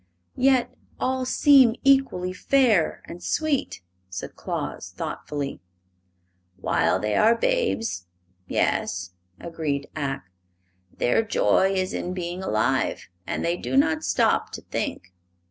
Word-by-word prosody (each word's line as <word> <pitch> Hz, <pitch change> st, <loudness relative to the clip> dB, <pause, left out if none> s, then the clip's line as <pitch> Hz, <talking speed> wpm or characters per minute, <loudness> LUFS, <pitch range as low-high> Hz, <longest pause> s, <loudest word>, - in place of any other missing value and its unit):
"Yet 260 Hz, -1 st, +3 dB, 0.3 s
all 260 Hz, 0 st, 0 dB
seem 260 Hz, -3 st, +5 dB
equally 270 Hz, -10 st, +3 dB
fair 220 Hz, -, +2 dB
and 175 Hz, +1 st, -9 dB
sweet," 290 Hz, -, -1 dB, 0.3 s
said 90 Hz, 0 st, -7 dB
Claus, -, -, -4 dB
thoughtfully. 140 Hz, -8 st, -5 dB, 1.0 s
"While -, -, +1 dB
they 105 Hz, 0 st, -1 dB
are 225 Hz, +2 st, +5 dB
babes 230 Hz, -, -1 dB, 0.4 s
yes;" 90 Hz, -1 st, -1 dB, 0.3 s
agreed 155 Hz, -4 st, -3 dB
Ak. 135 Hz, -7 st, -3 dB, 0.6 s
"Their 125 Hz, -, +2 dB
joy 195 Hz, -3 st, +2 dB
is 185 Hz, 0 st, -1 dB
in 180 Hz, +1 st, -3 dB
being 175 Hz, 0 st, -4 dB
alive, 130 Hz, -4 st, 0 dB, 0.2 s
and -, -, -2 dB
they 170 Hz, +1 st, +1 dB
do 265 Hz, -, -2 dB
not 310 Hz, +2 st, +3 dB
stop -, -, +1 dB
to -, -, -6 dB
think. 90 Hz, -, -4 dB
185 Hz, 115 wpm, -25 LUFS, -, 1.0 s, seem